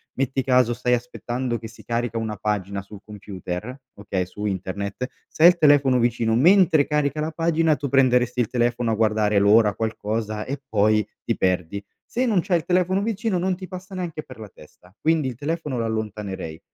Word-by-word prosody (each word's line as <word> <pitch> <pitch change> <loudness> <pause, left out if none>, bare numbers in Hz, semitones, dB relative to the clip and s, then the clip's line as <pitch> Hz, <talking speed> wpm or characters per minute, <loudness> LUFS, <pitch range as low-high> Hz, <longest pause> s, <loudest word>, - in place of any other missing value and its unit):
metti 135 0 -1
caso 125 -2 +3
stai 125 +1 0
aspettando 120 0 -4
che 110 - -8
si 115 - -15
carica 115 -1 -2
una 110 -2 -3
pagina 100 -1 -2
sul 100 +1 -13
computer, 105 +2 -7 0.2
okay, 100 -3 -3
su 105 +3 -7
internet, 100 +5 -3 0.2
se 155 - -1
hai 175 - +11
il 180 - +1
telefono 140 -4 +5
vicino 115 -1 +1
mentre 165 0 +5
carica 150 -1 0
la 160 +1 -2
pagina 165 -1 +2
tu 145 -1 -4
prenderesti 125 -2 +3
il 120 - +2
telefono 120 -1 0
a - - +1
guardare 105 -1 +2
l'ora, 105 +1 +4
qualcosa 110 -1 -3
e 140 +1 -4
poi 105 -1 +2 0.2
ti - - -1
perdi, 90 +1 -1 0.2
se 250 +2 -1
non 215 -6 +2
c'hai 180 -2 +1
il 155 - -11
telefono 185 +2 +1
vicino 215 -2 -1
non 185 +1 0
ti 185 0 -9
passa 185 +1 -9
neanche 170 -4 -4
per 130 - -13
la 110 - -8
testa, 90 +5 -19
quindi 160 -3 +2
il 125 - -4
telefono 150 -1 -3
lo 115 - -1
allontanerei. 105 -7 -4
120 Hz, 190 wpm, -23 LUFS, 105-155 Hz, 0.2 s, hai